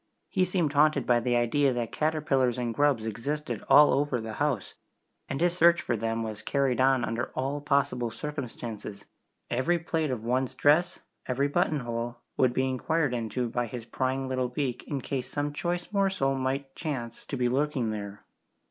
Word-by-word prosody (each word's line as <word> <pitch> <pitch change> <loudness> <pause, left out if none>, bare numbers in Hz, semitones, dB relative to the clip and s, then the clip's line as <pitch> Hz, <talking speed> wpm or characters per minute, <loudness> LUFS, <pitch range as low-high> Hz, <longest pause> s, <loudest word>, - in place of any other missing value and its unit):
He 185 -2 +2
seemed 175 -5 0
haunted 145 -2 +4
by 120 -1 +4
the 120 +1 0
idea 130 +4 +3
that 120 -2 -2
caterpillars 145 -5 +1
and 120 -2 -2
grubs 140 -4 +2
existed 120 +2 -3
all 145 +2 +8
over 140 -3 +1
the 110 -1 -6
house, 140 -10 0 0.6
and 135 - -2
his 175 +1 +2
search 170 0 +5
for 120 - -1
them 115 +1 -1
was 110 -2 -5
carried 135 -3 +1
on 130 -2 +4
under 120 +2 -2
all 140 +2 -2
possible 140 -4 +1
circumstances 115 -6 -6 0.5
every 130 +9 +2
plait 165 -2 -1
of 125 -4 -3
one's 125 +2 0
dress, 170 +5 +3 0.3
every 135 +3 +1
button 155 -1 +1
hole, 120 0 -4 0.2
would 130 -2 +3
be 130 +2 +1
inquired 135 +2 0
into 120 +1 -2
by 120 +1 -1
his 115 0 -7
prying 130 +2 -1
little 130 -1 -1
beak 125 -1 -2
in 140 -3 -3
case 130 -1 -3
some 145 0 -2
choice 175 +5 -3
morsel 190 -9 +2
might 135 +1 -2
chance 120 -8 -4
to 140 - -3
be 125 -1 +2
lurking 130 -2 0
there. 100 -1 -6
130 Hz, 175 wpm, -28 LUFS, 120-145 Hz, 0.6 s, all